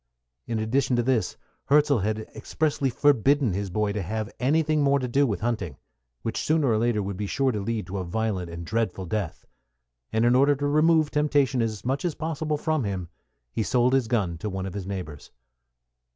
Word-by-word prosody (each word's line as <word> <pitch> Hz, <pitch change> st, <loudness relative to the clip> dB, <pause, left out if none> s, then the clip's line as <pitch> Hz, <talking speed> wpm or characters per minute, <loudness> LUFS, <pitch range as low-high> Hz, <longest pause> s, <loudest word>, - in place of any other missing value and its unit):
In 115 Hz, -, -1 dB
addition 125 Hz, +4 st, +1 dB
to 120 Hz, -, +1 dB
this, 125 Hz, -3 st, 0 dB, 0.3 s
Hirzel 145 Hz, -2 st, +4 dB
had 110 Hz, +2 st, -1 dB
expressly 145 Hz, -3 st, -1 dB
forbidden 140 Hz, -2 st, +3 dB
his 100 Hz, +1 st, -2 dB
boy 105 Hz, +2 st, 0 dB
to 105 Hz, 0 st, -2 dB
have 110 Hz, +4 st, -4 dB
anything 155 Hz, +3 st, +2 dB
more 140 Hz, 0 st, +4 dB
to 130 Hz, -2 st, -2 dB
do 140 Hz, +3 st, +2 dB
with 105 Hz, -, -2 dB
hunting, 110 Hz, -, -2 dB, 0.5 s
which 115 Hz, -, -2 dB
sooner 155 Hz, -4 st, +2 dB
or 110 Hz, -2 st, +2 dB
later 115 Hz, -3 st, +1 dB
would 100 Hz, -1 st, -4 dB
be 105 Hz, 0 st, -3 dB
sure 135 Hz, +5 st, +1 dB
to 105 Hz, -, -3 dB
lead 110 Hz, 0 st, -2 dB
to 95 Hz, +2 st, -4 dB
a -, -, -2 dB
violent 95 Hz, -1 st, -2 dB
and 85 Hz, 0 st, -7 dB
dreadful 100 Hz, -2 st, -1 dB
death; 100 Hz, -1 st, -3 dB, 0.7 s
and 110 Hz, +1 st, +2 dB
in 120 Hz, -, +5 dB
order 140 Hz, +2 st, +5 dB
to 145 Hz, +1 st, -3 dB
remove 155 Hz, +1 st, +3 dB
temptation 145 Hz, -4 st, +2 dB
as 110 Hz, -2 st, -3 dB
much 135 Hz, +3 st, -1 dB
as 170 Hz, -4 st, -1 dB
possible 155 Hz, -1 st, -2 dB
from 155 Hz, -2 st, 0 dB
him, 95 Hz, -4 st, -3 dB, 0.4 s
he -, -, -2 dB
sold 125 Hz, +3 st, +2 dB
his 135 Hz, -4 st, +2 dB
gun 95 Hz, -8 st, 0 dB
to 105 Hz, -, -3 dB
one 95 Hz, -1 st, -4 dB
of 95 Hz, -, -5 dB
his 100 Hz, -2 st, -5 dB
neighbors. 90 Hz, -7 st, -6 dB
115 Hz, 200 wpm, -26 LUFS, 100-140 Hz, 0.7 s, in